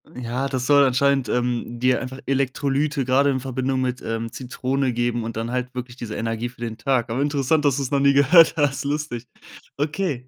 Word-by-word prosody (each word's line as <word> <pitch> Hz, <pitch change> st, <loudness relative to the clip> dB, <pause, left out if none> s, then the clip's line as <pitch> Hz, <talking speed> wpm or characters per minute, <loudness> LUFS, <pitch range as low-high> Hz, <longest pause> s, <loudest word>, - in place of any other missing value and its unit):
Ja, 125 Hz, +2 st, -3 dB
das 130 Hz, -2 st, -2 dB
soll 145 Hz, +1 st, +5 dB
anscheinend, 135 Hz, 0 st, +2 dB
ähm, 120 Hz, -1 st, -2 dB
dir 125 Hz, +1 st, +2 dB
einfach 130 Hz, +1 st, -6 dB
Elektrolyte 140 Hz, +1 st, 0 dB
gerade 135 Hz, +3 st, +3 dB
in 130 Hz, -1 st, 0 dB
Verbindung 130 Hz, 0 st, -2 dB
mit, 130 Hz, 0 st, -2 dB
ähm, 115 Hz, 0 st, -4 dB
Zitrone 130 Hz, +1 st, -2 dB
geben 120 Hz, 0 st, -1 dB
und 115 Hz, 0 st, -5 dB
dann 115 Hz, +1 st, -3 dB
halt 125 Hz, 0 st, -3 dB
wirklich 125 Hz, -1 st, -6 dB
diese 120 Hz, -4 st, -6 dB
Energie 115 Hz, +1 st, -3 dB
für 120 Hz, -1 st, -19 dB
den 115 Hz, -2 st, -4 dB
Tag. 125 Hz, -4 st, 0 dB
Aber 125 Hz, +4 st, -1 dB
interessant, 145 Hz, +1 st, +1 dB
dass 140 Hz, -3 st, +3 dB
du 140 Hz, -, -1 dB
es 130 Hz, -, -5 dB
noch 140 Hz, -, +2 dB
nie 140 Hz, 0 st, +4 dB
gehört 155 Hz, +5 st, +6 dB
hast, 145 Hz, -3 st, +1 dB
lustig. 140 Hz, -4 st, -3 dB, 0.5 s
Okay. 145 Hz, -3 st, -2 dB
130 Hz, 205 wpm, -22 LUFS, 120-140 Hz, 0.5 s, gehört